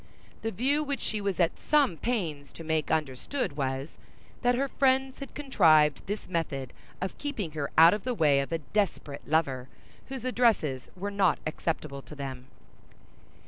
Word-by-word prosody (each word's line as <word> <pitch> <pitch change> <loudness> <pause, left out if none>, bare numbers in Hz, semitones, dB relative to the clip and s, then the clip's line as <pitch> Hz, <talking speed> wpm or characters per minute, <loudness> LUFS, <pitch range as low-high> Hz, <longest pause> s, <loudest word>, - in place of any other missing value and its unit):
The 225 - -1
view 270 +9 +1
which 280 -1 -2
she 215 -1 -2
was 200 -2 -2
at 170 -2 +2
some 290 - +3
pains 160 - -2
to 165 - -9
make 160 -1 0
understood 150 - -1
was, 135 +1 -3 0.4
that 245 0 +3
her 275 +3 0
friends 265 0 +1
had 275 - -8
contrived 160 - +4
this 205 +2 -4
method 145 -7 -3 0.3
of 185 - -4
keeping 235 - -3
her 150 -2 -3
out 165 +2 +9
of 210 - -3
the 250 -1 -1
way 150 -7 +4
of 140 - -3
a 165 - +1
desperate 160 -4 -2
lover 135 -5 0 0.4
whose 265 -2 -6
addresses 220 - +1
were 200 +2 -4
not 200 -3 +3
acceptable 155 -3 -3
to 150 - -12
them. 130 -3 -6
170 Hz, 165 wpm, -29 LUFS, 145-245 Hz, 0.4 s, out